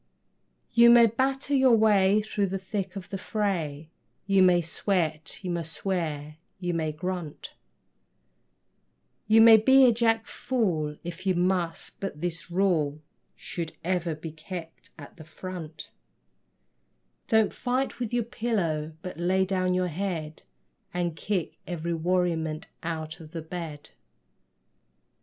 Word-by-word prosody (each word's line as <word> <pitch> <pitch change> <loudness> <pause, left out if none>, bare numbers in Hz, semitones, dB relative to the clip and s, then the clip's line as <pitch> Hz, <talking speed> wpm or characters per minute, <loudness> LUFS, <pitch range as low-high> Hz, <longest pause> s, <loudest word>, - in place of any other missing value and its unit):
You 235 0 +7
may 235 0 +8
batter 265 +5 0
your 260 -3 +5
way 210 -2 +4
through 205 -2 -1
the 190 +1 -2
thick 190 0 -4
of 190 -2 -7
the 195 - -3
fray, 165 -9 -2 0.3
You 195 -1 +4
may 180 -1 +6
sweat, 165 -2 -2
you 180 - -2
may 170 -1 -1
swear, 160 -3 -3 0.2
you 175 -2 -2
may 160 -2 -1
grunt; 175 0 -5 1.7
You 220 +1 +6
may 225 0 +10
be 265 +4 +6
a 245 - +6
jack 225 -1 +2
fool 170 -12 -1
if 175 +3 -6
you 185 - +3
must, 175 -2 -1
but 195 -7 -5
this 170 +1 -4
rule 170 -6 +1 0.4
Should 165 -2 -5
ever 175 -2 -1
be 155 +1 -7
kept 165 +1 -9
at 145 +3 -12
the 160 - -10
front: 160 -1 -8 1.4
Don't 220 -2 +3
fight 255 +1 -2
with 240 -3 -3
your 240 -1 +1
pillow, 190 -10 -2
but 180 -2 -7
lay 190 +2 +2
down 185 -1 0
your 185 0 +1
head 160 -3 -4 0.5
And 175 -2 -1
kick 190 -2 -3
every 170 -1 -3
worriment 165 -2 0 0.2
out 160 0 -4
of 160 0 -13
the 165 -2 -5
bed. 160 -3 -7
180 Hz, 135 wpm, -27 LUFS, 160-205 Hz, 1.7 s, may